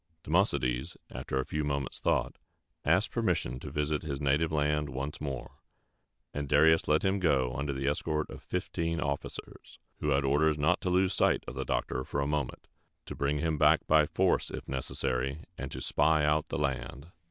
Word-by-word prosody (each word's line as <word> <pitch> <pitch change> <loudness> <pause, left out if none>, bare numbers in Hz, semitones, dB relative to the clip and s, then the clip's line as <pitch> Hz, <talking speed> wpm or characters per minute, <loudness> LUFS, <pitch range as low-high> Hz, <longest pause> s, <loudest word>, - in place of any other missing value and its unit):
Democedes, 65 +6 +1
after 65 - -3
a 65 - -1
few 75 0 -2
moments' 70 -2 -2
thought, - - 0 0.5
asked - - +2
permission 60 +1 0
to - - -7
visit 75 0 -1
his 70 -4 -4
native 75 +3 +2
land 75 -1 +1
once 70 +3 -5
more; 70 -3 -5 0.7
and 70 -1 -4
Darius 80 +3 +5
let 75 0 +3
him 95 +1 +2
go 65 -8 +2
under 70 +2 -2
the 70 0 -3
escort 75 +1 0
of - - -9
fifteen 85 -2 -2
officers, 70 -2 -5 0.2
who 75 - -1
had 70 -1 +2
orders 75 +3 +3
not 75 +1 +2
to 90 - -1
lose 95 +1 +3
sight - - +2
of - - -5
the - - -4
doctor 65 - -1
for - - -3
a 70 - +1
moment, 75 -3 -2 0.4
to - - -6
bring 70 +1 0
him 75 0 -1
back 75 +1 +5
by 75 -1 +4
force - - +1
if - - -7
necessary, 65 +1 -2
and 70 0 -6
to - - -5
spy 75 0 +2
out 75 +1 +2
the - - -3
land. 70 +2 -3
75 Hz, 185 wpm, -30 LUFS, 70-80 Hz, 0.7 s, Darius